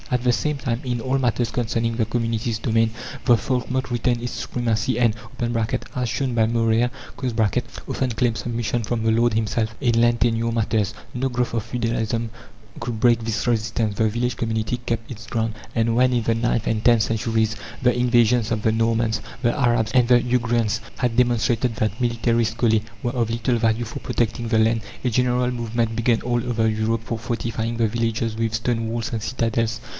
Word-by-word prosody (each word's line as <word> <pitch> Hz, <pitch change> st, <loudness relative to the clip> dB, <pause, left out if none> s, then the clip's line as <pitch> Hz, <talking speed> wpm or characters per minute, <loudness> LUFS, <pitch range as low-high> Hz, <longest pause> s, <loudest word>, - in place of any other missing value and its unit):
At 125 Hz, -2 st, 0 dB
the 125 Hz, -1 st, +3 dB
same 150 Hz, +7 st, 0 dB
time, 125 Hz, -3 st, -2 dB
in 125 Hz, -2 st, -2 dB
all 130 Hz, +3 st, 0 dB
matters 120 Hz, -2 st, 0 dB
concerning 115 Hz, -1 st, -1 dB
the 115 Hz, -1 st, +1 dB
community's 115 Hz, -1 st, -1 dB
domain, 115 Hz, -1 st, +2 dB, 0.3 s
the 120 Hz, -, +5 dB
folkmote 130 Hz, +2 st, -2 dB
retained 120 Hz, 0 st, 0 dB
its 120 Hz, -, -4 dB
supremacy 120 Hz, +1 st, -1 dB
and 115 Hz, -3 st, +3 dB, 0.8 s
(as 125 Hz, -2 st, -1 dB
shown 130 Hz, +1 st, -1 dB
by 110 Hz, -1 st, +3 dB
Maurer) 115 Hz, +1 st, +2 dB, 1.0 s
often 130 Hz, -2 st, -1 dB
claimed 115 Hz, 0 st, 0 dB
submission 120 Hz, -1 st, -2 dB
from 115 Hz, +1 st, -2 dB
the 110 Hz, -, +3 dB
lord 115 Hz, 0 st, +2 dB
himself 110 Hz, +1 st, 0 dB
in 120 Hz, -4 st, +2 dB
land 120 Hz, 0 st, +3 dB
tenure 115 Hz, 0 st, +1 dB
matters. 110 Hz, -2 st, 0 dB, 0.2 s
No 130 Hz, +2 st, -1 dB
growth 120 Hz, -1 st, -1 dB
of 115 Hz, -2 st, 0 dB
feudalism 115 Hz, -1 st, -1 dB, 0.5 s
could 115 Hz, -3 st, -3 dB
break 120 Hz, 0 st, +4 dB
this 110 Hz, +1 st, -2 dB
resistance; 110 Hz, -2 st, 0 dB
the 110 Hz, +1 st, +2 dB
village 120 Hz, +2 st, -1 dB
community 110 Hz, 0 st, -1 dB
kept 115 Hz, -1 st, -2 dB
its 115 Hz, -2 st, -8 dB
ground; 115 Hz, -1 st, -1 dB, 0.2 s
and 115 Hz, 0 st, +2 dB
when, 125 Hz, +1 st, +4 dB
in 120 Hz, -2 st, +1 dB
the 115 Hz, +1 st, +1 dB
ninth 115 Hz, 0 st, 0 dB
and 110 Hz, -1 st, 0 dB
tenth 120 Hz, -3 st, +5 dB
centuries, 110 Hz, 0 st, 0 dB, 0.3 s
the 125 Hz, -1 st, +3 dB
invasions 120 Hz, -2 st, +3 dB
of 110 Hz, -2 st, -1 dB
the 110 Hz, -, +3 dB
Normans, 115 Hz, 0 st, +1 dB, 0.2 s
the 120 Hz, +2 st, +2 dB
Arabs, 120 Hz, -5 st, +2 dB
and 125 Hz, -2 st, +4 dB
the 125 Hz, -1 st, +7 dB
Ugrians 120 Hz, -2 st, 0 dB, 0.2 s
had 125 Hz, -2 st, 0 dB
demonstrated 120 Hz, -1 st, +2 dB
that 110 Hz, +3 st, -1 dB
military 120 Hz, -1 st, +1 dB
scholae 110 Hz, 0 st, +2 dB, 0.2 s
were 120 Hz, -3 st, -1 dB
of 120 Hz, -3 st, 0 dB
little 115 Hz, +1 st, 0 dB
value 115 Hz, +1 st, +1 dB
for 115 Hz, -, -6 dB
protecting 115 Hz, 0 st, -1 dB
the 110 Hz, -1 st, +3 dB
land, 110 Hz, +1 st, +3 dB, 0.2 s
a -, -, +3 dB
general 125 Hz, +1 st, +2 dB
movement 115 Hz, -1 st, -1 dB
began 115 Hz, 0 st, +2 dB
all 120 Hz, -1 st, 0 dB
over 115 Hz, -2 st, +1 dB
Europe 110 Hz, +1 st, 0 dB
for 115 Hz, -, -3 dB
fortifying 115 Hz, 0 st, -3 dB
the 115 Hz, -1 st, +2 dB
villages 115 Hz, 0 st, -1 dB
with 115 Hz, 0 st, -1 dB
stone 115 Hz, -1 st, -1 dB
walls 115 Hz, 0 st, -3 dB
and 110 Hz, -2 st, -2 dB
citadels. 115 Hz, -1 st, -1 dB
115 Hz, 185 wpm, -23 LUFS, 110-120 Hz, 1.0 s, the